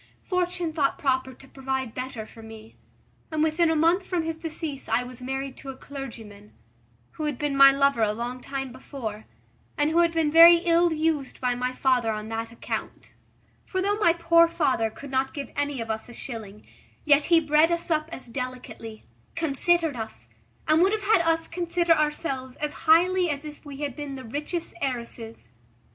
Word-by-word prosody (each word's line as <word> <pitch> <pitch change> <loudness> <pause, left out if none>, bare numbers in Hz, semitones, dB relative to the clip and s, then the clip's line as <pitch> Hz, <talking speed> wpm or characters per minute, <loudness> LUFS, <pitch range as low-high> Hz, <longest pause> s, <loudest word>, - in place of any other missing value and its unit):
Fortune 360 -3 -1
thought 290 -3 +1
proper 260 -1 0
to 265 +1 -16
provide 265 -3 -4
better 255 -4 -5
for 225 - -14
me, 220 0 -12 0.5
and 310 -1 0
within 320 +1 +2
a 320 - +2
month 335 +5 +3
from 360 -3 -2
his 325 0 -3
decease 315 -4 -6
I 230 +2 +2
was 250 0 -10
married 270 +1 -4
to 275 - -9
a 265 - -7
clergyman, 225 -8 -9 0.6
who 310 - -5
had 295 -4 -2
been 290 0 -1
my 275 0 +9
lover 275 -3 +2
a 215 -1 +3
long 240 +3 -5
time 270 -1 -5
before, 235 -4 -7 0.5
and 295 +1 +2
who 335 - +3
had 340 -1 +4
been 325 -3 +1
very 335 +2 +10
ill 340 0 +4
used 310 -3 -1
by 250 -1 +1
my 250 +1 -2
father 255 -3 +1
on 215 0 -5
that 225 0 -4
account: 230 - -6 0.5
for 375 - -3
though 405 +2 +1
my 335 -5 +5
poor 335 0 +5
father 265 -9 +1
could 275 +5 -11
not 265 0 0
give 280 -2 -5
any 285 -2 -1
of 225 -1 -3
us 220 +2 -5
a - - -10
shilling, 215 -5 -8 0.4
yet 290 -1 +5
he 335 -1 +5
bred 305 +1 +3
us 340 0 -2
up 310 0 +1
as 260 - -6
delicately, 250 -3 -7 0.3
considered 330 0 +1
us, 220 - -8 0.4
and 310 +2 +4
would 385 +3 +4
have 430 -1 -2
had 405 -3 +4
us 330 0 +1
consider 345 0 +1
ourselves, 300 -4 -2
as 295 0 -3 0.2
highly 355 +2 +5
as 290 0 -3
if 300 -1 -10
we 285 -1 -9
had 285 -4 -3
been 290 -2 -6
the 260 - -8
richest 300 +8 -4
heiresses. 235 -3 -5
280 Hz, 190 wpm, -26 LUFS, 250-330 Hz, 0.6 s, very